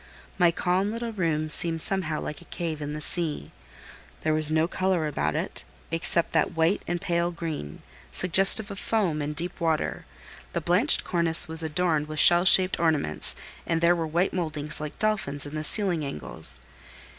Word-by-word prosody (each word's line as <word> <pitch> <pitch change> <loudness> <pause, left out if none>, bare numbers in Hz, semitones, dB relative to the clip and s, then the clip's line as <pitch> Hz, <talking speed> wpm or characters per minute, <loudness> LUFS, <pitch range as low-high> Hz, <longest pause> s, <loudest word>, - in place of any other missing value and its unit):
My 175 -2 +4
calm 180 +4 -1
little 230 +1 -5
room 155 -5 -1
seemed 165 +1 +8
somehow 170 -6 -2
like 150 - -7
a - - -16
cave 165 -4 -6
in 145 0 -5
the 150 - -6
sea. 160 0 -4 0.7
There 155 - -1
was 155 -1 +6
no 160 +1 +1
colour 185 -2 -1
about 75 - -3
it, - - -5 0.3
except 165 +1 0
that 160 +1 -1
white 165 +5 +1
and 175 - -3
pale 170 -1 -2
green, 160 - -7 0.3
suggestive 195 +3 +3
of 195 - -8
foam 185 -9 -2
and 150 +1 -5
deep 175 +2 -3
water; 160 -2 -2 0.5
the - - -1
blanched 185 - +2
cornice 170 -2 +4
was 160 +1 0
adorned 160 -1 -1
with 155 0 -5
shell 175 +3 +6
shaped 185 0 +5
ornaments, 155 - -1 0.3
and 165 -1 -1
there 170 +1 +3
were 165 -2 -4
white 170 +4 -1
mouldings 150 -4 -3
like 150 -1 -7
dolphins 195 -10 -2
in 145 - -10
the 155 0 -5
ceiling 180 -2 -1
angles. 65 - +1
165 Hz, 175 wpm, -25 LUFS, 155-180 Hz, 0.7 s, seemed